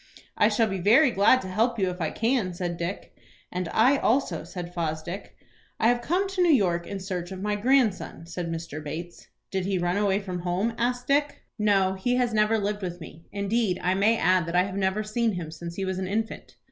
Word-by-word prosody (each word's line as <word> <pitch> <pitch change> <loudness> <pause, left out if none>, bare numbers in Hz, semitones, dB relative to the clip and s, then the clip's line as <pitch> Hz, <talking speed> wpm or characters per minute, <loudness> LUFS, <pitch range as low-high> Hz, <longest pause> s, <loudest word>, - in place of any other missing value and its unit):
"I 210 - +4
shall 225 +1 +2
be 195 -3 -3
very 240 - +5
glad 215 +5 +4
to - - -6
help 225 +6 +1
you 190 -3 +1
if 180 0 -8
I 160 - 0
can," 225 -6 0
said 175 -1 -3
Dick. 170 +3 -5 0.4
"And 180 -2 -3
I 255 +6 +4
also," 230 - +1
said 175 0 -7
Fosdick. 170 +2 -4 0.4
"I 225 - +4
have 240 0 +2
come 360 +9 0
to 385 -1 -1
New 350 -2 +5
York 175 - +2
in 200 - -5
search 185 -2 -4
of 190 - -6
my 210 0 0
grandson," 220 -7 +1
said 170 0 -5
Mr. 160 -2 -5
Bates. 165 +4 -7 0.2
"Did 190 -1 -1
he 195 -1 0
run 175 +1 0
away 200 -1 +2
from 185 -3 -5
home?" 180 +6 -1
asked 245 +1 -1
Dick. 285 +1 0 0.2
"No, 195 -3 +3
he 220 +6 0
has 245 -2 +1
never 215 +1 +3
lived 205 0 -2
with 175 -2 -5
me. 165 0 -12
Indeed, 200 -1 0
I 180 - +2
may 210 +4 +3
add 185 -3 +2
that 170 - -3
I 180 - +5
have 190 0 -5
never 195 +2 0
seen 220 +1 0
him 170 -4 -5
since 170 +1 -7
he 195 - -2
was 190 0 -2
an 190 - -3
infant." 220 +3 -3
195 Hz, 225 wpm, -26 LUFS, 175-225 Hz, 0.4 s, very